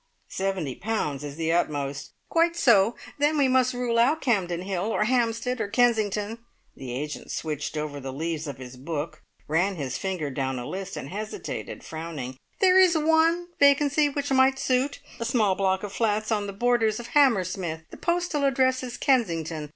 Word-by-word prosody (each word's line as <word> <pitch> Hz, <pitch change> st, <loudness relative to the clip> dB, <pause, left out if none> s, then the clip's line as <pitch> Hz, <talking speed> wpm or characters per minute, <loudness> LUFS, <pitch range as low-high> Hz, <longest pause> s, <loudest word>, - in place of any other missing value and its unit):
"Seventy 190 Hz, -8 st, -2 dB
pounds 150 Hz, -, -2 dB
is 145 Hz, -1 st, -6 dB
the 165 Hz, 0 st, -1 dB
utmost 145 Hz, -4 st, -1 dB
" -, -, -45 dB
"Quite 335 Hz, +1 st, +3 dB
so. 230 Hz, -, +4 dB, 0.2 s
Then 295 Hz, +2 st, +2 dB
we 280 Hz, -2 st, +4 dB
must 255 Hz, -1 st, +2 dB
rule 240 Hz, -2 st, 0 dB
out 280 Hz, +7 st, +4 dB
Campden 180 Hz, -8 st, 0 dB
Hill, 190 Hz, -1 st, -2 dB
or 220 Hz, -1 st, +1 dB
Hampstead, 240 Hz, +1 st, 0 dB
or -, -, -1 dB
Kensington." 220 Hz, -1 st, +1 dB, 0.4 s
The 130 Hz, -2 st, -7 dB
agent 150 Hz, +5 st, -5 dB
switched 150 Hz, -1 st, -3 dB
over 150 Hz, -1 st, -3 dB
the 135 Hz, -1 st, -6 dB
leaves 160 Hz, +2 st, -3 dB
of 140 Hz, -, -6 dB
his 125 Hz, -1 st, -10 dB
book, 150 Hz, +3 st, -5 dB, 0.3 s
ran 180 Hz, +6 st, +1 dB
his 135 Hz, -6 st, -4 dB
finger 180 Hz, -7 st, -3 dB
down 130 Hz, -1 st, -2 dB
a 120 Hz, -, -5 dB
list, 195 Hz, +4 st, -5 dB
and 135 Hz, -, -6 dB
hesitated, 215 Hz, +2 st, -6 dB
frowning. 155 Hz, -6 st, -6 dB, 0.3 s
"There 375 Hz, -1 st, +6 dB
is 360 Hz, -3 st, +5 dB
one 325 Hz, +3 st, +3 dB
vacancy 285 Hz, +1 st, +4 dB
which 285 Hz, 0 st, -3 dB
might 265 Hz, 0 st, +4 dB
suit 270 Hz, +1 st, 0 dB, 0.2 s
a -, -, -2 dB
small 225 Hz, -5 st, +2 dB
block 190 Hz, 0 st, 0 dB
of 205 Hz, -1 st, -5 dB
flats 215 Hz, 0 st, 0 dB
on 205 Hz, -2 st, 0 dB
the 200 Hz, -, -5 dB
borders 225 Hz, 0 st, +1 dB
of 240 Hz, 0 st, -8 dB
Hammersmith. 185 Hz, -, +2 dB
The -, -, -10 dB
postal 345 Hz, -4 st, 0 dB
address 260 Hz, -1 st, +2 dB
is 250 Hz, -2 st, -6 dB
Kensington. 165 Hz, -, 0 dB
210 Hz, 180 wpm, -26 LUFS, 160-260 Hz, 0.4 s, There